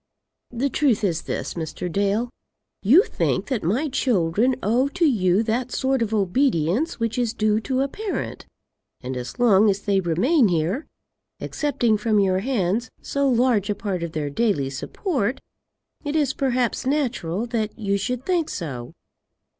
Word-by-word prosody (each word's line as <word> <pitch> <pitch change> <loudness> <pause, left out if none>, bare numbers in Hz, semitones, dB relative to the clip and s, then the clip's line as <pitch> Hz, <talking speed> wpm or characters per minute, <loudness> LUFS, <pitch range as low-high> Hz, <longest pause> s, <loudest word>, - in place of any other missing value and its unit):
"The 245 +3 -1
truth 250 -8 +2
is 170 -5 0
this, - - -4
Mr. 160 +1 -4
Dale. 205 +6 0 0.5
You 280 - +6
think - - -1
that 255 -5 -1
my 230 - 0
children 240 - +1
owe 240 +6 +2
to 345 +4 0
you 200 - +3
that 240 +3 -1
sort 265 -1 0
of 225 -2 0
obedience 215 - +1
which 230 +1 -1
is 235 -1 -1
due 215 -1 +2
to 260 +4 -1
a 275 - +1
parent, 415 +8 -5 0.5
and 130 +1 -5
as 125 - -6
long 215 -4 +5
as 200 0 0
they 200 -1 +1
remain 215 - +3
here, 180 - -1 0.5
accepting 240 -8 0
from 215 -1 +2
your 190 -2 +2
hands 220 -1 -1
so 280 -1 0
large 235 -5 +2
a 205 - +1
part 195 -3 -3
of 170 -1 -4
their 150 -2 -2
daily 145 -9 0
support, 260 - -2 0.6
it 290 0 -3
is 290 -4 +2
perhaps 255 -3 0
natural 240 - -1
that 225 -3 -3
you 200 -3 0
should 250 +5 -2
think 345 -4 +1
so. 130 -9 -5
225 Hz, 160 wpm, -23 LUFS, 190-260 Hz, 0.6 s, You